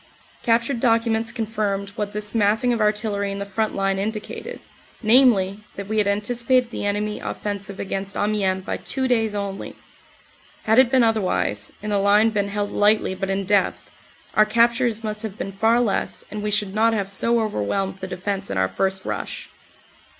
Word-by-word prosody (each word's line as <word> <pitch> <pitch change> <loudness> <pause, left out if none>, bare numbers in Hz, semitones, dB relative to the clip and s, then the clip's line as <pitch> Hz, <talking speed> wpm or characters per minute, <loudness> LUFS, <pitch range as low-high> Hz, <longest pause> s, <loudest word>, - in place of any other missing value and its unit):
Captured 235 +2 +1
documents 230 -1 +2
confirmed 210 -4 -2
what 205 0 -4
this 210 0 -4
massing 225 +3 +3
of 230 - -1
artillery 210 -1 0
in 195 - -4
the 200 - -4
front 215 +2 -2
line 195 0 0
indicated, 215 +1 -5 0.4
namely, 215 -5 +4 0.2
that 200 -1 -6
we 220 +1 0
had 205 - +2
anticipated 240 +4 +1
the 205 - -3
enemy 210 +1 -1
offensive 200 -1 -4
against 195 0 -3
Amiens 195 -3 0
by - - -2
two 260 -1 -2
days 225 -4 +1
only. 200 -1 -4 0.9
Had 220 +3 +4
it 260 -2 +6
been 260 -1 +4
otherwise, 185 - 0
and 210 - -3
the 200 - +2
line 205 +3 +4
been 205 -2 0
held 205 0 -2
lightly 210 -2 +3
but 190 +1 -4
in 195 0 -1
depth, 205 0 0 0.4
our 215 - +6
captures 230 +1 +2
must 215 -1 -3
have 215 -2 -5
been 195 - -4
far 225 +4 +2
less 225 -5 -1
and 210 0 -4
we 210 - -2
should 205 -2 0
not 225 +2 +3
have 200 -3 -1
so 230 +4 +1
overwhelmed 195 - -1
the 190 - -5
defense 195 +2 -3
in - - -3
our 95 0 +2
first 190 - -1
rush. - - -5
210 Hz, 180 wpm, -23 LUFS, 195-225 Hz, 0.9 s, it